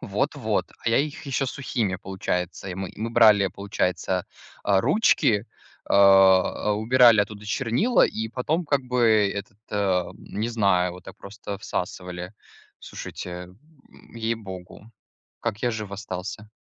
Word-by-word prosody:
Вот-вот. - - -1
А - - -2
я 115 - +3
их 145 0 -3
еще 135 0 -1
сухими, 115 -7 -2
получается. 95 0 -4
И 90 - -4
мы 95 0 -4
и - - -15
мы 115 +1 -2
брали, 110 -4 +6
получается, 95 -1 -2 0.4
а, 100 -2 +3
ручки, 120 - +2 0.4
а, 95 +1 +5
убирали 115 +1 +5
оттуда 105 0 -4
чернила 125 - +2
и 110 0 -4
потом, 150 +9 -1
как 140 -2 +1
бы, 115 -5 +3
этот, 100 +1 -7
ам, 95 -4 0
не 110 +3 -4
знаю, 100 -6 +2
вот 90 0 -12
так - - -11
просто 100 0 -8
всасывали. 90 -1 -5 0.5
Слушайте, 90 0 -8 0.7
ей-богу, 110 -3 -6 0.5
как 110 -3 -2
я 120 - +2
жив 110 -3 -5
остался? 100 +1 -6
105 Hz, 135 wpm, -25 LUFS, 95-115 Hz, 0.7 s, брали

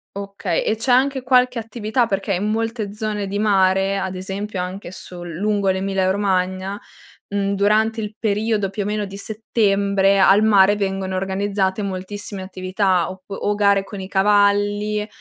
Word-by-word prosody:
Okay, 200 -3 -2
e 215 - +1
c'è 235 +4 -1
anche 265 +2 +3
qualche 250 -1 +3
attività, 225 +1 -1
perché 195 -1 -1
in 200 +4 -1
molte 225 -1 -2
zone 210 -2 -3
di 200 +1 -3
mare, 195 -2 +2
ad 190 0 -3
esempio 195 +2 -5
anche 180 +1 -5
sul 175 -1 -9
lungo 205 +1 0
l'Emilia 190 0 0
Romagna, 190 0 -1 0.5
mhmm, 200 0 -1
durante 215 +3 +2
il 210 0 -6
periodo 210 -2 0
più 205 +1 -4
o - - -2
meno 210 0 -1
di 195 0 -9
settembre, 200 -2 +1
al 195 +2 +6
mare 205 -2 +5
vengono 195 -1 -2
organizzate 195 +1 -1
moltissime 195 +1 -5
attività 185 -1 0
oppu 190 +1 -10
o 205 - -1
gare 200 -1 +3
con 195 0 -9
i 190 - -6
cavalli 205 +1 +2
200 Hz, 160 wpm, -21 LUFS, 190-210 Hz, 0.5 s, al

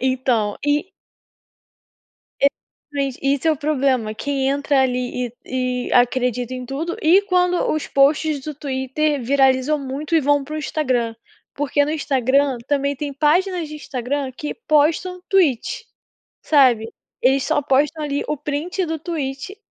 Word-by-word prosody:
Então 250 -5 0
e 295 +5 0 1.5
E - - +6 0.5
mente, 275 -3 -2
esse 275 +2 +1
é - - +5
o - - 0
problema, 265 -7 0
quem 270 +3 -1
entra 280 0 +2
ali 250 -1 -1 0.2
e 255 -1 -2
e - - -1
acredita 250 0 +1
em 255 -1 -5
tudo 310 +7 -4
e 345 +5 +5
quando 360 -2 +2 0.2
os 310 - -2
posts 290 +1 +2
do 305 +2 -6
Twitter 280 +1 -1
viralizam 270 +3 +2
muito 280 +4 -5
e - - +6
vão 290 0 +2
para 305 +3 -7
o - - -2
Instagram. 255 -7 -1 0.4
Porque 290 0 +1
no 295 - -2
Instagram 275 -2 +1
também 280 0 0
tem 285 +1 -5
páginas 340 +4 +1
de 305 - -8
Instagram 270 -1 -3
que 295 +4 -5
postam 325 +5 +2
Tweet, 365 - +1 0.6
sabe, 245 -7 +4 0.3
eles 265 +1 +3
só 315 -2 +1
postam 290 +3 +1
ali 285 -1 -2
o 300 - -2
print 300 +6 -2
do 320 -1 -3
Tweet 305 +2 -5
280 Hz, 150 wpm, -21 LUFS, 260-305 Hz, 1.5 s, E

